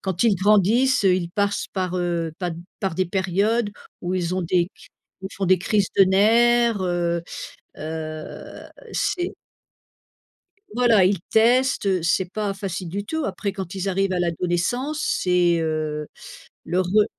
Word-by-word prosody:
quand 190 -3 -2
ils 230 -4 +4
grandissent, 210 +6 +3
heu, 185 -2 +5
ils 175 -2 -2
passent 200 +2 -1
par, 185 -1 -1
heu, 170 -2 -1
pa 180 -2 -2 0.3
par 190 -4 -1
des 185 +2 +1
périodes 200 +5 0 0.3
où 180 +1 -2
ils 180 0 -1
ont 185 - -1
des 175 +1 +1
c - - -17 0.3
où 190 - -5
ils - - -12
font 195 - -1
des 185 0 +4
crises 200 +2 +1
de 195 - +9
nerfs, 230 +3 +4
heu, 175 -2 0 0.6
heu, 155 0 -7 0.2
c'est 360 -2 -1 1.4
Voilà, 235 -5 +4
ils 190 -2 +1
testent, 245 +1 +3
heu, 185 -3 +1
c'est 180 +2 +1
pas 210 -1 -2
facile 190 -3 -5
du 200 +3 -4
tout. 320 +3 -2
Après 195 +1 -3
quand 190 -1 -6
ils 190 +1 -3
arrivent 195 0 0
à 180 - 0
l'adolescence, 180 - -1
c'est, 180 - +2
heu, 155 -1 -2 0.6
le 180 +3 +1
re 205 +4 +3
190 Hz, 160 wpm, -23 LUFS, 175-210 Hz, 1.4 s, de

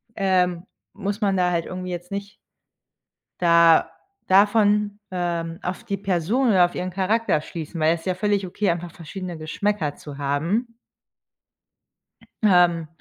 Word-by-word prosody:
ähm, 180 -2 +1 0.3
muss 200 +1 -4
man 195 -2 +2
da 180 -1 +2
halt 170 -1 -1
irgendwie 185 0 -5
jetzt 175 +2 -7
nicht 200 0 -5 1.0
da 170 -2 +5 0.4
davon, 205 +1 +3
ähm, 170 -2 -3
auf 180 +5 -4
die 200 -4 -3
Person 200 +7 0
oder 185 -4 +5
auf 175 - -6
ihren 180 +1 -3
Charakter 195 +1 +1
schließen, 160 +1 -7
weil 155 +1 +3
es 170 - -5
ist - - -17
ja 185 - 0
völlig 205 0 0
okay, 195 +2 -1
einfach 170 0 -5
verschiedene 175 +1 -7
Geschmäcker 160 0 -2
zu 145 -2 -10
haben. 170 - -1 1.7
Ähm, 175 -5 +4
180 Hz, 145 wpm, -23 LUFS, 170-200 Hz, 1.7 s, da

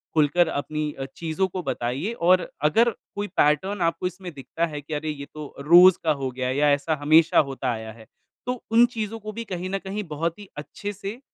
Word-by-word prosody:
खुलकर 160 +3 +3
अपनी 150 0 -3
अ, 135 - -3
चीज़ों 170 +3 -1
को 185 0 -5
बताइए 135 - -2
और 185 -3 +2 0.2
अगर 235 +5 +4 0.3
कोई 205 0 -2
पैटर्न 180 +7 +2
आपको 165 +2 0
इसमें 185 -1 -8
दिखता 145 +4 -3
है 150 -3 -6
कि, 150 +2 -8
"अरे, 155 +1 -3
ये 140 -2 -5
तो 150 -2 -8
रोज़ 175 +5 +7
का 160 - +3
हो 135 -3 -2
गया 125 0 -3
है 130 - -1
या 150 0 +4
ऐसा 150 +3 +1
हमेशा 155 +3 +5
होता 130 -2 -2
आया 110 -1 -5
है।" 110 -1 -15 0.4
तो 250 -1 -3
उन 235 +1 +7
चीज़ों 220 0 -3
को 215 0 -7
भी 230 - -5
कहीं 185 -1 -4
न 195 - -1
कहीं 195 +2 -5
बहुत 165 +4 -2
ही 205 -2 -11
अच्छे 205 +7 -6
से 200 +5 -7
165 Hz, 215 wpm, -24 LUFS, 145-190 Hz, 0.4 s, रोज़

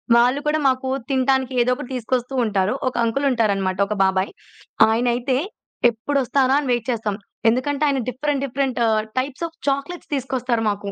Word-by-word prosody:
వాళ్ళు 245 +4 +4
కూడా 305 +1 +1
మాకు 260 0 0 0.2
తినటానికి 265 0 +1
ఏదోకటి 250 +2 -1
తీసుకొస్తూ 250 +1 -2
ఉంటారు. 205 0 +1
ఒక 255 - -1
అంకులు 230 +5 0
ఉంటారనమాట 195 -5 +1
ఒక 210 - -2
బాబాయి. 190 0 +1 0.6
ఆయనైతే 245 +3 +1 0.5
ఎప్పుడొస్తారా? 265 +2 +1
అని 275 -3 -3
వెయిట్ 240 0 0
చేస్తాం. 220 -3 -2 0.3
ఎందుకంటే 280 +5 0
ఆయన 275 -2 +1
డిఫరెంట్, 275 +1 -2
డిఫరెంట్ 265 -1 -2
ఆహ్, 220 -1 +2 0.2
టైప్స్ 280 +5 -3
ఆఫ్ 325 0 -18
చాక్లెట్స్ 280 +5 -4
తీసుకొస్తారు 250 -3 -1
మాకు. 200 0 -4
255 Hz, 150 wpm, -22 LUFS, 225-275 Hz, 0.6 s, వాళ్ళు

